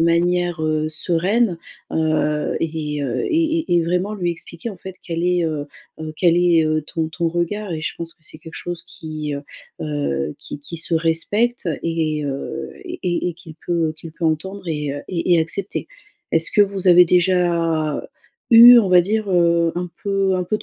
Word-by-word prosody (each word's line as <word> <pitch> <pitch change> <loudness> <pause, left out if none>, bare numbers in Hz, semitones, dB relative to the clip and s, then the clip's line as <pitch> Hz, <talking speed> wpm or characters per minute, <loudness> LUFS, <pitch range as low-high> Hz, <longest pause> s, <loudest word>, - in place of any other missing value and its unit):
manière 175 +1 +1 0.3
sereine. 175 +6 +1 0.4
Heu 155 -1 0
et, 155 -2 -3
heu 130 -4 -2
et 320 0 +1
et 250 - -1
et 170 - +3
vraiment 180 +5 -1
lui 180 -4 -1
expliquer 170 +5 -7
en 200 - -10
fait 190 +1 -9
quel 170 -1 -4
est, 180 -1 +2
heu, 155 -3 -3 0.3
heu, 155 0 -5
quel 170 -1 +3
est, 175 -2 +4
heu, 155 0 0
ton 160 +1 -3
ton 165 +1 -1
regard. 175 +4 -2
Et 160 - -4
je 155 - -3
pense 165 0 -6
que - - -45
c'est 155 - -10
quelque 160 +1 -12
chose 175 -1 -5
qui, 155 -2 -6
heu 140 - -6 0.4
heu, 75 - -2
qui - - -8
qui 160 +4 -6
se 170 +1 -1
respecte 175 +8 +1
et 160 -2 -1
heu 140 -1 -5
et 185 - -2
et - - -3
qu'il 165 -2 -13
peut 165 -2 0
qu'il 160 0 -10
peut 165 - -6
entendre 190 +5 -3
et 150 -3 -2
heu 145 - -5
et 175 0 +1
et 165 - +4
accepter. 185 +5 -2 0.5
Est-ce 165 0 +4
que - - +3
vous 195 -2 +2
avez 180 0 +8
déjà 170 -4 +1 0.5
eu 240 +1 +10
on 210 -5 +2
va 180 -1 +7
dire, 210 +3 -1
heu, 170 -2 +3
un 180 0 -3
peu 195 -1 +1
un 180 - -1
peu 215 +4 -1
de - - -12
170 Hz, 190 wpm, -20 LUFS, 160-185 Hz, 0.5 s, eu